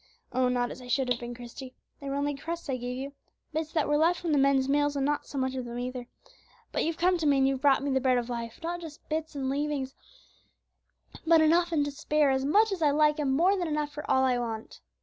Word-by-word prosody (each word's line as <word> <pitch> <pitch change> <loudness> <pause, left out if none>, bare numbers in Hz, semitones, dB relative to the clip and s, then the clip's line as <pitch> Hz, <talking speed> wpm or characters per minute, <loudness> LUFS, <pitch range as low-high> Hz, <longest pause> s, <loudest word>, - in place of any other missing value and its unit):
"Oh! 255 0 +2
not 245 -1 0
as - - -9
I 250 - -11
should 250 +1 0
have 240 - +1
been, 240 0 -6
Christie; 245 +2 -10 0.2
they 280 - -6
were 275 - -2
only 285 +1 0
crusts 330 +5 -6
I - - 0
gave 250 +1 -4
you, 275 +2 -6 0.4
bits 315 0 -2
that 310 -3 +1
were 295 - +2
left 335 +3 +3
from 335 - -2
the 290 - +3
men's 270 -1 +3
meals, 290 +1 +2
and 275 -1 0
not 295 +1 -1
so 280 - -7
much 260 0 0
of 255 -1 -4
them 240 0 -6
either; 250 0 -5 0.6
but - - 0
you've 330 0 -1
come 355 +1 +2
to 315 - 0
me 280 -1 +4
and 270 0 +4
you've 270 -1 -1
brought 275 -1 +4
me 280 - -1
the 265 0 +1
Bread 255 -1 +3
of 240 -1 -2
Life, 235 -2 -5
not 345 +1 -3
just 320 -3 -11
bits 315 0 -3
and 270 -2 -2
leavings, 280 -1 -2 1.3
but 330 0 +6
enough 340 +2 +3
and 295 -3 +2
to 290 - -3
spare, 295 0 +1
as 265 0 0
much 420 +9 +4
as 380 -3 -3
I 300 - +4
like, 300 +1 +3
and 280 -3 +1
more 350 +9 +3
than 355 -3 -2
enough 300 -1 -1
for 300 - -8
all 265 - +4
I 250 -2 +2
want." 225 -2 -5
280 Hz, 265 wpm, -28 LUFS, 260-310 Hz, 1.3 s, but